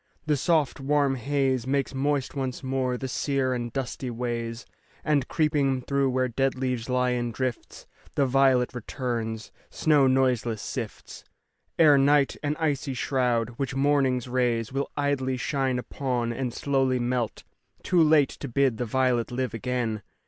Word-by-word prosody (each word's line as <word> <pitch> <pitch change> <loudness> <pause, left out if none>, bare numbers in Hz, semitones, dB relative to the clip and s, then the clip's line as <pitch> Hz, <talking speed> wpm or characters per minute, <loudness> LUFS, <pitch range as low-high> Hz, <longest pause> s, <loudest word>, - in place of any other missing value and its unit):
The 150 -1 +2
soft, 150 -1 +1
warm 140 0 +2
haze 130 -1 0
Makes 140 0 0
moist 140 0 -1
once 130 -2 -4
more 130 -1 -1
the 130 - -4
sere 130 0 0
and 120 -1 -3
dusty 130 0 -4
ways, 115 0 -4 0.4
And, 145 -4 +1
creeping 145 -5 +1
through 140 0 +1
where 130 0 +1
dead 135 +2 0
leaves 125 -2 -2
lie 125 0 +2
in 120 -1 -1
drifts, 125 0 -4 0.3
The 140 - +3
violet 130 -1 +3
returns. 115 -2 -4 0.2
Snow 150 -4 +3
noiseless 125 -4 +1
sifts - - -6 0.5
Ere 150 -4 +6
night, 140 0 +3
an 150 0 -1
icy 140 -4 -1
shroud, 125 -3 0
which 135 -2 -3
morning's 135 -3 +2
rays 120 -2 0
Willidly 140 -1 -1
shine 130 0 -1
upon 125 -2 -2
and 125 0 -3
slowly 135 0 +1
melt, 120 -2 -2 0.4
Too 180 -2 +3
late 155 -3 +5
to 140 - -7
bid 130 -2 +1
the 125 - -2
violet 125 0 +1
live 125 -2 -2
again. 115 -2 -2
130 Hz, 150 wpm, -26 LUFS, 125-140 Hz, 0.5 s, Ere